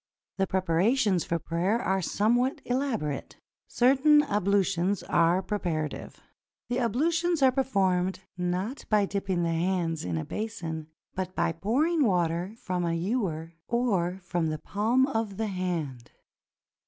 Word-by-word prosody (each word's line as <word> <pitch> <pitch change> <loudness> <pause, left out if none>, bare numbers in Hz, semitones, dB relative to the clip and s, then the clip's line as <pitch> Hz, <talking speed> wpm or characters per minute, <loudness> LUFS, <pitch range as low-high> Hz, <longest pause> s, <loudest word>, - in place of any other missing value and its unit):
The 195 0 +1
preparations 190 +3 +2
for 170 - 0
prayer 175 +7 0
are 190 -4 0
somewhat 240 +8 +1
elaborate. 240 - -2 0.3
Certain 280 +4 +5
ablutions 200 - +1
are 170 +3 +2
preparative. 165 -8 -3 0.5
The 245 +1 0
ablutions 325 +7 +1
are 260 - +6
performed, 190 -9 +1 0.2
not 185 +8 -2
by 210 -2 +4
dipping 195 -3 -1
the 170 - 0
hands 165 -1 0
in 85 -2 -2
a 80 - -3
basin, 170 -8 -5 0.3
but 185 0 -4
by 170 -1 +1
pouring 275 - +1
water 180 -1 0
from 185 -7 -2
a 170 -1 0
ewer 170 -4 -2
or 195 -7 0
from 175 -2 -1
the 155 0 -2
palm 220 - +1
of 225 -7 -2
the 220 - -1
hand. 175 - -3
190 Hz, 130 wpm, -28 LUFS, 170-235 Hz, 0.5 s, are